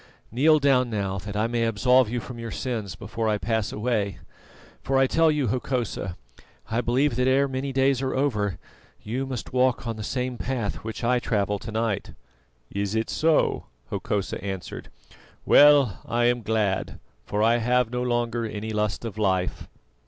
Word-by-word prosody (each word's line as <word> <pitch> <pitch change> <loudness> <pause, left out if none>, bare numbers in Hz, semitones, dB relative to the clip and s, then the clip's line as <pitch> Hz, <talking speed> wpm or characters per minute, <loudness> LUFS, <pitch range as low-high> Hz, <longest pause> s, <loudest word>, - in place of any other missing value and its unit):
Kneel 150 +7 +5
down 135 -4 +3
now, 100 -3 -2
that 105 +1 -6
I 105 - +2
may 115 0 0
absolve 125 +2 +3
you 120 +1 -2
from 120 +1 -8
your 115 0 -5
sins 115 -5 -4
before 115 -1 -3
I 105 - +1
pass 110 +2 -1
away; 105 -3 -1 0.6
for 135 0 0
I 135 - +5
tell 165 +4 +3
you, 150 -6 +1
Hokosa, 120 -7 -2 0.5
I 115 +2 +1
believe 125 +2 +1
that 125 0 +2
ere 135 +2 +3
many 135 +1 -3
days 135 0 +2
are 130 -1 -1
over 105 -8 0 0.5
you 130 +5 -3
must 125 -3 -6
walk 130 -1 +2
on 115 -1 -3
the 110 - -5
same 125 +1 -3
path 120 -5 -2
which 110 +1 -7
I 125 +1 +3
travel 105 -3 0
to 110 - -7
night." 110 -2 -2 0.6
"Is 100 +1 -2
it 110 0 -1
so?" 160 -1 +2 0.3
Hokosa 100 -2 -2
answered. 95 -2 -6 0.6
"Well, 145 -8 +6
I 120 0 +1
am 120 0 +2
glad, 105 -3 -1 0.3
for 105 +1 0
I 115 +1 +4
have 125 0 +1
no 125 0 -2
longer 120 -1 0
any 110 0 -4
lust 105 +1 -1
of 110 -1 -6
life." 95 -3 0
115 Hz, 175 wpm, -25 LUFS, 105-130 Hz, 0.6 s, Well